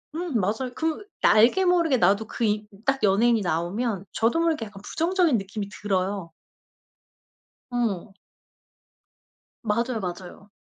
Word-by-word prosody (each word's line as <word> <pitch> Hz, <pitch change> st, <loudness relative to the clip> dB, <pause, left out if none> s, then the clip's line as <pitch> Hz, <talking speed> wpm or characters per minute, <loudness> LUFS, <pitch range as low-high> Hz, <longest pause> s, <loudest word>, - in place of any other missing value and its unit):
음 330 Hz, -9 st, -1 dB
맞아요. 220 Hz, +7 st, -1 dB
그 320 Hz, +6 st, -2 dB, 0.2 s
나 -, -, +6 dB
알게 245 Hz, -, +5 dB
모르게 335 Hz, -7 st, +3 dB
나도 205 Hz, +3 st, +2 dB
그 235 Hz, -, -4 dB
이 210 Hz, 0 st, 0 dB, 0.2 s
딱 270 Hz, 0 st, +1 dB
연예인이 220 Hz, +3 st, +3 dB
나오면 185 Hz, +5 st, -2 dB
저도 235 Hz, +9 st, +1 dB
모르게 315 Hz, -9 st, 0 dB
약간 200 Hz, -1 st, -12 dB
부정적인 335 Hz, -5 st, +1 dB
느낌이 200 Hz, +1 st, -5 dB
들어요. 190 Hz, -4 st, -2 dB, 1.4 s
어. 220 Hz, -5 st, -2 dB, 1.5 s
맞아요, 235 Hz, +2 st, 0 dB
맞아요. 185 Hz, +2 st, -7 dB
220 Hz, 265 characters per minute, -25 LUFS, 195-265 Hz, 1.5 s, 나